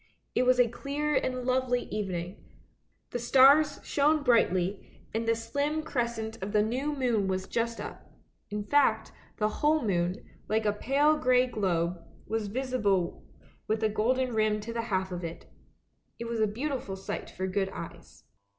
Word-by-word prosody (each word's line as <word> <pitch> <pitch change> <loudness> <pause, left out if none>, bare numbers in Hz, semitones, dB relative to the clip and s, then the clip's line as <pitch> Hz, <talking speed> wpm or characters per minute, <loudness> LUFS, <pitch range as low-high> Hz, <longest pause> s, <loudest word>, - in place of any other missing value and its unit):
It 250 - +2
was 255 0 +4
a 245 - +6
clear 285 +5 -2
and 255 -3 0
lovely 255 -1 +1
evening; 185 -3 -4 0.7
the 245 - -2
stars 275 +5 +5
shone 300 +1 +2
brightly, 195 -6 +1
and 225 +1 -1
the 230 - +3
slim 285 +7 -2
crescent 235 -6 -3
of 200 +2 -4
the 210 -1 +4
new 265 +7 -1
moon 235 -7 +1
was 185 0 -1
just 230 0 -2
up; - - -8 0.4
in 210 0 -3
fact, 290 +7 +2 0.3
the 215 - +2
whole 300 +7 +1
moon, 180 -2 +1 0.3
like 220 +1 +1
a 210 - +2
pale 285 +8 +2
grey 255 -2 +4
globe, 180 -7 -1 0.2
was 220 0 -2
visible 210 -6 0 0.4
with 220 +1 0
a 220 - +3
golden 250 +4 +1
rim 215 -1 +2
to 230 +2 -6
the 230 - -1
half 190 -1 0
of 180 0 -5
it. 165 0 -6 0.7
It 235 - -5
was 230 -1 -3
a 215 - +3
beautiful 245 -2 -3
sight 190 - -5
for 185 - -4
good 190 +1 -1
eyes. - - -10
230 Hz, 165 wpm, -29 LUFS, 205-255 Hz, 0.7 s, a